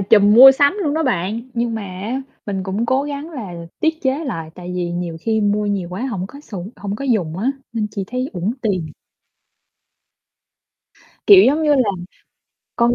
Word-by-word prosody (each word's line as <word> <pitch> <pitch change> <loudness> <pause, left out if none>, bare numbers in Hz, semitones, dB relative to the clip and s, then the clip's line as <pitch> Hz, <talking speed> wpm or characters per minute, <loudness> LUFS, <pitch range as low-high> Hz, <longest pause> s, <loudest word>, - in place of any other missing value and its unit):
trùm 205 +1 +5
mua 260 +4 +11
sắm 285 +7 +3
luôn 295 -4 0
đó 320 - +1
bạn, 220 - -1
nhưng 235 -1 -1
mà 220 - -4
á, 200 +7 -5 0.2
mình 195 -2 -2
cũng 195 +5 -2
cố 260 +3 +2
gắng 290 +2 -5
là 220 - -7 0.3
tiết 320 0 0
chế 275 +3 0
lại, 165 - -5
tại 180 0 -8
vì 175 -1 -2
nhiều 175 -1 -4
khi 220 +3 0
mua 210 0 +1
nhiều 195 -4 -2
quá 180 +3 -6
hổng 265 - -2
có 225 - -3
không 185 0 -3
có 280 +8 -12
sùng 200 -8 -8
hổng 200 0 -4
có 275 - -6
dùng 190 -11 0
á. 235 +7 +1 0.2
Nên 225 -2 -1
chỉ 200 -2 -4
thấy 255 +3 -3
uổng 185 +3 -2
tiền. 190 -7 -1 2.4
Kiểu, 395 -2 +9
giống 300 +4 +2
như 295 -1 +4
là, 255 -6 +2 0.9
con 235 0 +3
220 Hz, 200 wpm, -19 LUFS, 190-270 Hz, 2.4 s, mua